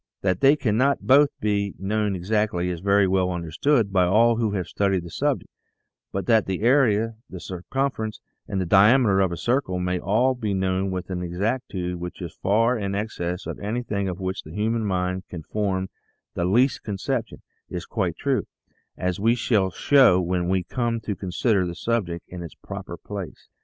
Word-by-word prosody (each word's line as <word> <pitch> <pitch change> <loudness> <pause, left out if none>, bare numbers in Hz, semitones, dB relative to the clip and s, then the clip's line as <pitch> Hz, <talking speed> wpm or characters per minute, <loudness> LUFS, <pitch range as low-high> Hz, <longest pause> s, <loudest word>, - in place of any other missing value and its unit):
That 95 -2 0
they 140 +2 +6
cannot 135 +1 +1
both 140 +2 +6
be 100 -2 -1
known 105 +1 -1
exactly 95 -1 0
is 85 - -4
very 100 +1 +3
well 95 -1 +2
understood 95 - 0
by 90 -1 +4
all 115 +5 +4
who 115 -2 +1
have 95 -3 -1
studied 95 0 0
the 85 - -9
subject, - - -1 0.6
but 95 -1 -3
that 110 0 +3
the 95 0 -2
area, 115 -3 +3
the 95 - -8
circumference, 110 +5 -3 0.3
and 95 - -2
the 95 - 0
diameter 105 +2 +5
of 95 -2 +2
a 85 - -4
circle 120 -6 0
may 90 0 -1
all 120 +8 +2
be 110 -5 -2
known 95 0 0
with 95 0 -4
an 90 -1 -2
exactitude 90 0 -2
which 90 0 -7
is 85 -2 -6
far 115 +4 +2
in 100 -1 -2
excess 90 -4 -3
of - - -5
anything 105 -2 -2
of 90 0 -5
which 95 +1 -3
the 80 +3 -11
human 110 +2 0
mind 90 -1 -1
can 85 -3 -7
form 95 0 -1 0.5
the 85 - -1
least 120 +9 +3
conception, 110 +4 -3 0.3
is - - -5
quite - - -2
true, - - 0 0.5
as 90 +1 -2
we 115 +3 +3
shall 110 -5 +1
show 125 -2 +5
when 90 0 -1
we 95 -1 +1
come 120 +3 -1
to 105 -2 -3
consider 95 +1 0
the 85 - -5
subject 90 -4 -2
in 90 -1 -8
its 85 - -8
proper - - -8
place. 100 -5 -8
100 Hz, 185 wpm, -24 LUFS, 90-115 Hz, 0.6 s, they